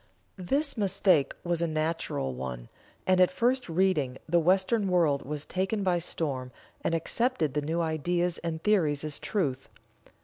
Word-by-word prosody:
This 275 - 0
mistake 190 -6 +3
was 175 -1 -1
a 170 - +1
natural 155 - -2
one, 65 -2 -6 0.4
and 185 0 +4
at 180 - +6
first 250 -1 0
reading 165 -7 +1
the 170 +2 +3
Western 190 +5 +2
world 165 -6 +2
was 150 +1 -5
taken 195 +3 -1
by 180 -2 +2
storm, 135 -7 -3 0.3
and 165 - +1
accepted 165 - 0
the 150 - 0
new 160 +4 -1
ideas 170 +2 0
and 165 -1 -4
theories 160 -9 +2
as 155 -2 -3
Truth. 140 -11 -2
170 Hz, 150 wpm, -28 LUFS, 150-190 Hz, 0.4 s, at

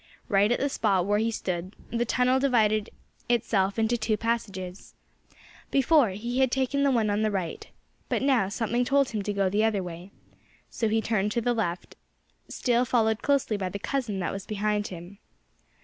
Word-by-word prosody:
Right 205 +1 +3
at 245 - +1
the 280 - +1
spot 200 -9 +1
where 205 +1 +2
he 225 +1 +1
stood 185 -3 -4 0.2
the 235 0 0
tunnel 250 +3 +2
divided 215 -5 +2 0.4
itself 210 -4 +1
into 225 +2 +1
two 220 -1 0
passages. 200 -5 -4 0.7
Before, 275 -2 +4
he 235 +6 -3
had 265 -1 +4
taken 265 +2 0
the 280 - +4
one 225 -5 +2
on 205 +1 0
the 215 - +2
right. 185 -5 -4 0.4
But - - 0
now 255 -8 +3
something 235 +3 0
told 275 +1 +2
him 215 -2 -3
to 205 - -2
go 200 -1 +1
the 205 +3 +1
other 215 -4 +1
way. 175 +1 -8 0.6
So 225 - -1
he 220 +1 +1
turned 210 -2 0
to 235 - 0
the 245 +1 +1
left, 180 -6 -3 0.5
still 245 -1 +1
followed 225 -3 +1
closely 275 -7 +1
by 190 -2 -2
the 195 - -5
cousin 235 -2 -2
that 180 - -2
was 195 -1 -7
behind 210 0 -1
him. 180 +3 -10
220 Hz, 185 wpm, -27 LUFS, 200-240 Hz, 0.7 s, Before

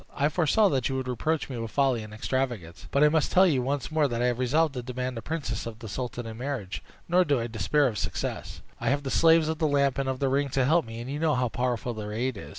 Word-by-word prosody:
I 145 +1 +2
foresaw 175 +6 +3
that 130 -6 0
you 135 - -2
would 130 -1 -3
reproach 150 +6 -1
me 125 -4 -5
with 115 -1 -4
folly 135 -2 +1
and 110 0 -9
extravagance; 110 -6 -3
but 140 - +3
I 150 - +7
must 155 -1 +1
tell 185 +1 +6
you 145 -8 +2
once 140 +3 -2
more 155 -2 +3
that 120 -3 -3
I 125 +1 +2
am 120 - -1
resolved 145 +5 +2
to 125 - -4
demand 125 +1 -4
the 115 - -5
princess 135 -9 -3
of 115 -2 -7
the 115 -1 -9
sultan 120 +2 -4
in 110 0 -7
marriage, 125 -8 -4 0.3
nor 180 +2 +4
do 145 -6 +1
I 115 - -2
despair 115 - +1
of 110 -7 -1
success. 85 -2 -4 0.2
I - - 0
have 140 +1 0
the 135 - -3
slaves 165 -1 +5
of 160 -1 -2
the 155 - +2
Lamp 140 -2 +2
and 135 -1 0
of 130 - -1
the 135 - 0
Ring 140 +1 +1
to 130 - +4
help 165 +3 +3
me, 115 +1 -7
and 125 +3 -6
you 145 - -3
know 160 -2 +2
how 125 -1 +1
powerful 125 0 -2
their 105 -1 -6
aid 125 +3 -1
is. 100 - -9
130 Hz, 280 wpm, -27 LUFS, 120-145 Hz, 0.3 s, I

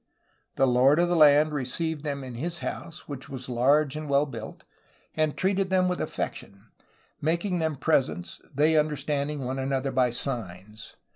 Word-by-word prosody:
The 135 - +3
lord 130 +3 +4
of 175 +1 +3
the 175 - +2
land 150 -1 +6
received 150 +3 -2
them 140 -2 -3
in 130 -2 -7
his 165 +8 -3
house, 165 -2 -6
which 140 -3 -7
was 130 -2 -7
large 135 +4 +2
and 155 -1 -5
well 140 +1 +3
built, 115 -6 -8 0.5
and 155 -1 0
treated 190 0 +1
them 185 -1 +3
with 180 0 -1
affection, 100 +2 -5 0.5
making 170 +4 0
them 160 -2 0
presents, 135 - 0
~ - - -30
they 150 +3 +3
understanding 150 -1 -1
one 130 +2 -3
another 135 0 -1
by 130 -1 +2
signs. 110 -5 -5
145 Hz, 165 wpm, -27 LUFS, 130-155 Hz, 0.5 s, land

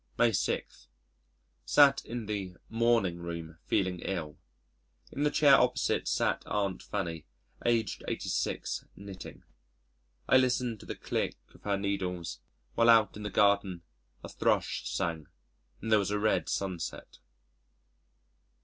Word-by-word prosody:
May 120 -1 +4
6. 95 - -2 0.8
Sat 140 - +5
in 120 -1 -5
the 100 -4 -4
"morning 115 -6 +2
room" 85 -2 -7
feeling 95 -2 +1
ill. 85 -6 -4 0.7
In 140 - -5
the 150 - +3
chair 145 -1 +5
opposite 125 -2 +3
sat - - +1
Aunt 100 -2 -1
Fanny, 85 -6 -4 0.4
aged 115 -4 +1
86, - - -2
knitting. 100 -1 -10 0.8
I 130 - +6
listened 125 -3 +1
to - - -13
the - - -4
click - - -2 0.2
of - - -18
her 100 -1 +1
needles, 95 -3 -3 0.3
while 115 0 +4
out 110 -4 +5
in 105 - -8
the 105 - -3
garden 100 -3 +2 0.4
a - - -7
thrush - - 0
sang, 80 -3 -2 0.6
and 110 - -3
there 110 - +6
was 100 - -1
a 105 - 0
red 105 -5 +1
sunset. 90 -4 -4
100 Hz, 130 wpm, -30 LUFS, 90-115 Hz, 0.8 s, I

